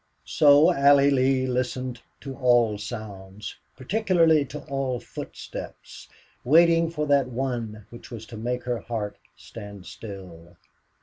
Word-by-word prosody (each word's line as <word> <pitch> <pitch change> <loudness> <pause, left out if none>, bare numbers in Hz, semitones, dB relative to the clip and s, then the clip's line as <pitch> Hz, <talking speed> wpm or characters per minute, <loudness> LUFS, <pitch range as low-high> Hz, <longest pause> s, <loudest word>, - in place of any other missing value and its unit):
So 145 0 +5
Allie 140 0 +5
Lee 130 -1 +2
listened 125 -1 -2 0.2
to 135 -2 -7
all 120 -5 +3
sounds, 105 -2 -8 0.2
particularly 165 - +2
to 150 +4 -9
all 135 -4 -2
footsteps, - - -9 0.3
waiting 165 +4 +5
for 150 -2 -2
that 140 -2 +3
one 120 -5 -4
which 120 - -12
was 115 -2 -8
to 115 - -11
make 125 +3 -3
her 120 -2 -2
heart 110 -2 -5 0.2
stand 100 -3 -10
still. 90 -5 -10
125 Hz, 125 wpm, -25 LUFS, 110-140 Hz, 0.3 s, So